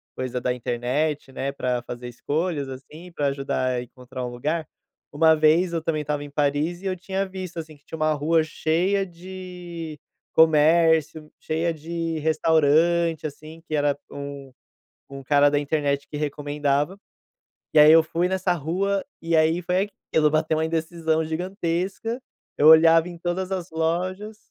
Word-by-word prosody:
coisa 125 -1 -3
da 125 0 0
internet, 130 +5 -2
né, 135 +1 -3
pra 125 -3 -1
fazer 125 0 -7
escolhas, 145 +3 -2
assim, 150 +7 -10
pra 145 -3 0
ajudar 135 -2 -1
a 120 - -1
encontrar 125 +1 -8
um - - -4
lugar, 150 +6 -3 0.4
uma 160 +2 +5
vez 160 +3 +3
eu 165 - -1
também 155 -2 -1
estava 145 0 -3
em 145 - -9
Paris, 145 +5 0
e - - -11
eu 185 -1 -1
tinha 195 +2 -2
visto, 185 -2 -7
assim, 155 -2 -9
que 145 - -35
tinha - - -7
uma 155 0 +2
rua 160 +2 +2
cheia 175 +6 0
de 175 -3 -8 0.3
comércio, 160 0 +4
cheia 165 +2 -1
de 165 +1 -4
restaurante, 160 +1 +2
assim, 155 +3 -12
que 155 - -2
era 145 -1 +1
um 140 -1 -7 0.6
um 135 0 -8
cara 145 +1 +4
da 145 - +2
internet 145 -1 -1
que 150 - -6
recomendava, 145 +3 -1 0.7
e 155 - +4
aí, 150 +1 +9
eu 165 0 +8
fui 170 +3 -1
nessa 190 -1 0
rua, 185 +5 -1 0.2
e 165 0 -1
aí 160 +3 +3
foi 185 +4 0 0.2
aquilo, 150 -1 +4
bateu 155 0 +1
uma 160 - +1
indecisão 160 0 -1
gigantesca, 185 +7 -3 0.4
eu 150 - +4
olhava 165 +1 +7
em 175 - -9
todas 180 +2 -3
as 180 -2 -3
lojas 185 +6 -2
160 Hz, 160 wpm, -24 LUFS, 145-170 Hz, 0.7 s, aí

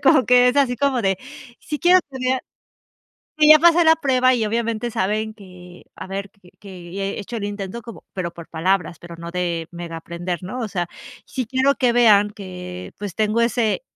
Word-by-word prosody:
como 285 -6 +5
que 250 0 +6
es 250 - 0
así, 255 -3 +2
como 265 -3 +1
de, 195 -1 +1 0.4
si 300 -1 -5
quiero 360 +1 +6
tener, 260 -1 -1 1.0
sí, 300 0 +5
ya 310 - +10
pasé 340 +1 +5
la 320 - +7
prueba 255 -3 +3
y 225 -3 0
obviamente 230 +1 -2
saben 215 +1 -1
que, 180 -3 -14
a - - -8
ver, 195 +1 -5 0.3
que 180 -3 -11
ya 195 0 -4
he 200 +2 -3
hecho 230 +4 -6
el 205 - -4
intento 205 +2 -5
como 230 -2 -11
pero 175 -2 -3
por 170 -1 -11
palabras, 170 0 -1
pero 170 -1 -11
no 170 0 -8
de 170 -2 -2
mega 170 -1 -7
aprender, 175 +2 -5
¿no? 245 +8 -5
O 225 - -3
sea, 175 -3 -3 0.4
sí 255 - -3
quiero 265 +3 +2
que 245 -3 +2
vean 210 -4 +5
que, 180 -3 -8
pues, 205 -3 -6
tengo 215 +1 +1
ese 235 - +1
210 Hz, 200 wpm, -21 LUFS, 180-250 Hz, 1.0 s, ya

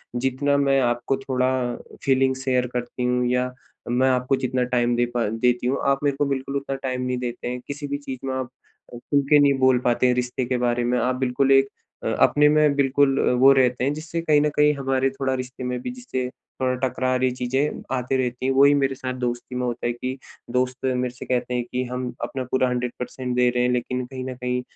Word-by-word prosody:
जितना 135 +3 +1
मैं 135 -1 +3
आपको 120 +2 0
थोड़ा 130 -1 0 0.5
फीलिंग 130 -1 +2
शेयर 130 -1 0
करती 125 0 -3
हूँ 125 0 +1
या 125 0 0 0.4
मैं 130 +2 +3
आपको 125 +1 +1
जितना 130 -1 -1
टाइम 120 -1 +1
दे 120 0 +2
पा 115 -3 +1
देती 120 +2 +1
हूँ, 135 - +1
आप 140 0 +2
मेरे 140 -1 +1
को 145 - +3
बिल्कुल 140 0 -3
उतना 135 0 -4
टाइम 130 -1 -3
नहीं 125 0 -1
देते 120 -1 -4
हैं। 125 0 -3
किसी 145 0 -5
भी 140 0 -2
चीज़ 135 -3 -7
में 130 - -1
आप 130 -1 -3 0.5
खूल 140 +4 0
के 150 -1 +7
नहीं 140 -1 +5
बोल 130 -1 +4
पाते 120 +1 +3
हैं 125 - +3
रिश्ते 125 0 -2
के 125 0 -1
बारे 120 0 0
में, 125 +1 +1
आप 125 0 0
बिल्कुल 130 +1 +1
एक 135 0 +5 0.4
अ - - 0
अपने 150 0 +5
में 150 -1 +3
बिल्कुल 140 0 +3 0.2
वो 135 +1 +8
रहते 125 -1 +2
हैं 140 +2 +1
जिससे 160 +2 -5
कहीं 150 -3 +3
न 150 - +2
कहीं 150 0 +4
हमारे 135 -1 0
थोड़ा 135 -1 -2
रिश्ते 130 0 -6
में 125 0 -2
भी - - -4
जिससे 130 - -4 0.3
थोड़ा 130 0 +1
टकरार 130 +1 -1
ये 130 - +4
चीज़ें 130 +4 -1
आती 130 +1 -1
रहती 125 0 -2
हैं। 135 - +2
वही 140 +2 +6
मेरे 135 -1 +1
साथ 130 0 -4
दोस्ती 120 +1 -3
में 125 0 -1
होता 120 0 -3
है - - +1
कि 130 +2 -5 0.3
दोस्त 125 +1 -1
मेरे 125 -1 0
से - - -8
कहते 125 0 -1
हैं 120 -1 0
कि 125 0 -1
हम 125 0 -4
अपना 130 -1 -3
पूरा 130 -1 +2
100% 125 0 -3
दे 125 0 +4
रहे 125 0 0
हैं 125 - +2
लेकिन 125 +1 -2
कहीं 130 0 -7
न 130 -1 -5
कहीं 125 0 -2
130 Hz, 225 wpm, -23 LUFS, 125-135 Hz, 0.5 s, वो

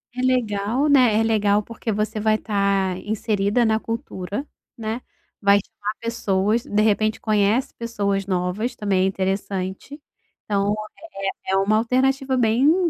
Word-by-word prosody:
É 250 - -2
legal, 245 +1 +1
né, 250 -6 +5
é 225 - +3
legal, 210 -2 +2
porque 230 +1 -5
você 215 +1 -1
vai 215 0 +3
tá 200 -3 0
inserida 210 +1 +1
na 220 -1 +2
cultura, 225 0 -5 0.3
né. 225 +1 -4 0.4
Vai 200 0 +5
chamar 210 +1 -5
pessoas, 220 -1 0
de 210 +1 +1
repente, 215 0 +2
conhece 215 +3 +1
pessoas 200 -4 -2
novas, 185 +5 -1
também 195 -3 +1
é - - +3
interessante. 190 +6 -3 0.4
Então 200 0 +1 0.2
é 195 -12 -6 0.2
é - - +1
é - - +4
uma 200 +3 +3
alternativa 260 +3 +1
bem 270 +10 +3
215 Hz, 145 wpm, -22 LUFS, 200-235 Hz, 0.4 s, né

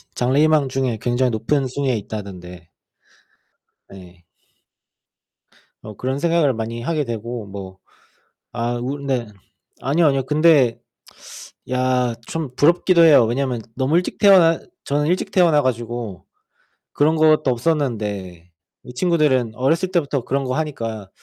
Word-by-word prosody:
장래 130 +4 +1
희망 155 -3 +3
중에 130 -3 -1
굉장히 125 +1 +1
높은 130 +5 -1
순위에 130 0 -1
있다던데 90 -5 -9 1.2
네. 90 -2 -14 1.6
뭐 110 - -10
그런 130 +6 -3
생각을 165 -4 +2
많이 115 +1 -5
하게 155 +3 -1
되고 115 0 -5
뭐 95 -1 -9 0.7
아 120 0 -2
우리 140 +3 -5
네 130 -4 -1 0.5
아니요, 155 +5 +2
아니요. 135 -2 +1
근데 150 -4 +3 0.9
야 125 -1 0
좀 155 -6 -5
부럽기도 170 +4 +3
해요. 145 -7 +7
왜냐면 125 0 -2
너무 135 +4 0
일찍 180 - -1
태어나 180 -5 +5 0.2
저는 145 +1 0
일찍 180 +2 -1
태어나 165 -5 +4
가지고 120 -5 -4 0.7
그런 155 +2 +2
것도 155 -2 +3
없었는데 105 - -2 0.3
이 125 - -11
친구들은 140 -7 +1
어렸을 160 +9 0
때부터 140 -7 -1
그런 140 +1 -1
거 130 -1 -2
하니까 115 -10 -4
130 Hz, 275 characters per minute, -20 LUFS, 115-150 Hz, 1.6 s, 해요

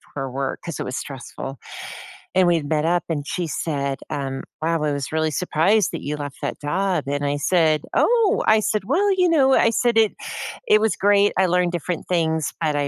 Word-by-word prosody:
for 135 -2 -3
work, 135 +1 -3
'cause 170 -5 -5
it - - -2
was 130 - -4
stressful. 135 0 -7 0.8
And 185 0 +4
we 170 -2 +3
met 150 +1 -1
up, 175 +1 +1
and 145 -3 -2
she 175 -2 -2
said, 140 -3 -2
um, 135 -1 -4 0.2
"Wow, 165 0 0
I 150 -1 0
was 140 -2 -4
really 155 0 0
surprised 180 +6 +2
that - - -5
you 150 +1 -3
left 145 -2 -6
that - - -4
job," 185 +5 0
and 145 +1 -1
I 145 0 0
said, 155 0 +2
"Oh," 460 -4 +3
I 215 0 +5
said, 215 0 0
"Well, 400 - +2
you 365 -1 +4
know," 275 -6 +4
I 230 - +4
said, 235 0 +1
"It 220 -2 +4 0.5
it 215 - +6
was 220 0 +1
great, 205 0 +3
I 190 - +4
learned 180 0 +2
different 175 0 -3
things, 160 -3 0
but 155 -2 +1
I 145 -1 0
165 Hz, 210 wpm, -22 LUFS, 145-200 Hz, 0.8 s, it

